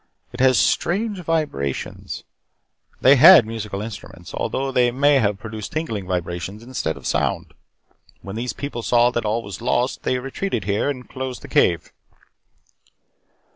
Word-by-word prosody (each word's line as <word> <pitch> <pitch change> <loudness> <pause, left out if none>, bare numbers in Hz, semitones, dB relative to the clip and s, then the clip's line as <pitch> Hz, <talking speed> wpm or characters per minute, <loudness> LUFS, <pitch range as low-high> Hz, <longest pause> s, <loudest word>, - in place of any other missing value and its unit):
It 120 - -8
has 130 -1 +5
strange 200 +3 +1
vibrations. 155 - -3 0.8
They 135 +2 +7
had 155 -1 +9
musical 105 -3 -5
instruments 100 -5 -9
although 135 0 -2
they 125 -1 +3
may 140 +3 +3
have 105 -4 +1
produced 110 0 -7
tingling 115 - -3
vibrations 90 +3 -4
instead 115 - -3
of 65 - -13
sound. - - -1 0.7
When 100 +1 -7
these 120 +2 -3
people 140 -4 -5
saw 120 +1 +3
that 120 -2 -2
all 110 +2 0
was 100 -2 -8
lost, 125 +1 0
they 130 - 0
retreated 135 - -3
here 100 +7 0
and 130 -3 -5
closed 130 -1 -6
the - - -8
cave. 85 -2 +1
120 Hz, 145 wpm, -22 LUFS, 100-135 Hz, 0.8 s, had